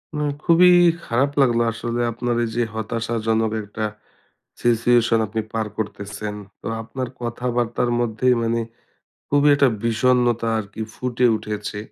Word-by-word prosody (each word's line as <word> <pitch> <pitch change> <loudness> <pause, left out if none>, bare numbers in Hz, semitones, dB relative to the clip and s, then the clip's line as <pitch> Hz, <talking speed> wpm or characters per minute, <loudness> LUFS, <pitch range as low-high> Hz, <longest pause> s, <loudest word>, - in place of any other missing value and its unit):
না। 150 0 -1 0.2
খুবই 180 +2 +6 0.3
খারাপ 130 +5 +1
লাগলো। 120 -3 +3
আসলে 120 +1 -3
আপনার 120 +1 -2
এইযে 120 +1 -1
হতাশাজনক 110 0 -1
একটা 105 +1 -4 0.8
situation 120 0 +3
আপনি 110 +1 -3
পার 110 -1 -1
করতেছেন। 105 0 -5 0.3
তো - - -11 0.2
আপনার 130 +2 -5
কথাবার্তার 120 0 -1
মধ্যেই 120 +2 +2
মানে 115 0 0 0.7
খুবই 145 +1 +4
একটা 140 -1 +4 0.2
বিষণ্ণতা 120 0 +2
আরকি 105 0 -7
ফুটে 125 0 0
উঠেছে। 105 -1 -5
115 Hz, 120 wpm, -22 LUFS, 110-125 Hz, 0.8 s, খুবই